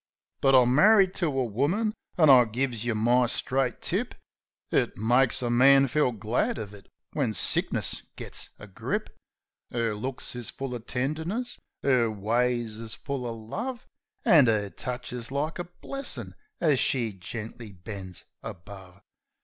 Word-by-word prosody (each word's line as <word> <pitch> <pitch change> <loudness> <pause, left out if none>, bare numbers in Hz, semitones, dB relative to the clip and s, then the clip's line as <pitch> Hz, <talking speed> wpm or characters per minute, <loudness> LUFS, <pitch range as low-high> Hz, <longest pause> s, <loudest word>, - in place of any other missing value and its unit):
But 135 0 +5
I'm 125 -1 +5
marri'd 195 +4 +5
to 175 - +1
a 135 -3 0
woman; 155 - 0 0.2
an', 155 -5 +7
I 125 -2 +8
gives 120 0 -2
yeh 120 -2 -1
my 120 +3 +3
straight 125 +1 -1
tip, - - -2 0.6
It - - +1
makes 120 +4 +3
a 120 - 0
man 135 +3 +6
feel 135 0 +1
glad 115 +2 -1
uv 105 -2 -6
it 100 -1 -14 0.3
when 125 -8 0
sickness - - +3
gits - - -3
a - - -11
grip. 95 -2 -4 0.6
'Er 115 -2 -1
looks 125 +4 -5
is 120 -2 -3
full 135 -1 -5
uv 120 -2 -7
tenderness, 160 - -3 0.3
'er 125 -4 +3
ways 115 +2 -1
is 115 -1 -3
full 140 -2 -5
uv 115 -2 -6
love, 240 - -5 0.4
An' 145 -8 +6
'er 105 -3 0
touch 125 0 -5
is 120 0 -4
like 150 +5 -2
a 175 - -3
blessin' 275 +10 -4 0.3
as 150 -6 +3
she 115 -5 +1
gently 110 +3 -8
bends 95 -1 -8 0.2
above. 95 -2 -10
125 Hz, 155 wpm, -27 LUFS, 110-140 Hz, 0.6 s, I